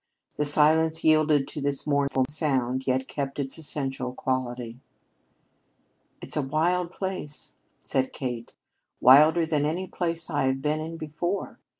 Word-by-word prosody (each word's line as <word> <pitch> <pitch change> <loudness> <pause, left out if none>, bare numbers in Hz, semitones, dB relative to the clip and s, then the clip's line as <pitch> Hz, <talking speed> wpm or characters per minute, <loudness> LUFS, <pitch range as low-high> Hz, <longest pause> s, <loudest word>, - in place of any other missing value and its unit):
The 150 - -1
silence 155 +2 +4
yielded 155 -2 +3
to 150 - -6
this 140 0 -1
mournful 140 -2 +1
sound, 130 -4 -1
yet 130 0 0
kept 140 -1 -4
its 140 +1 -3
essential 135 -4 -3
quality. 125 -2 -3 1.4
"It's - - -3
a 150 - +1
wild 170 +6 0
place," 185 -7 -5 0.2
said 130 0 -2
Kate; 120 -4 -6 0.4
"wilder 155 +6 +6
than 155 -2 0
any 165 +5 -1
place 170 -3 -1
I 145 -4 0
have 130 0 0
been 150 +2 -1
in 165 +1 -6
before. 165 +5 -4
145 Hz, 135 wpm, -26 LUFS, 130-160 Hz, 1.4 s, wilder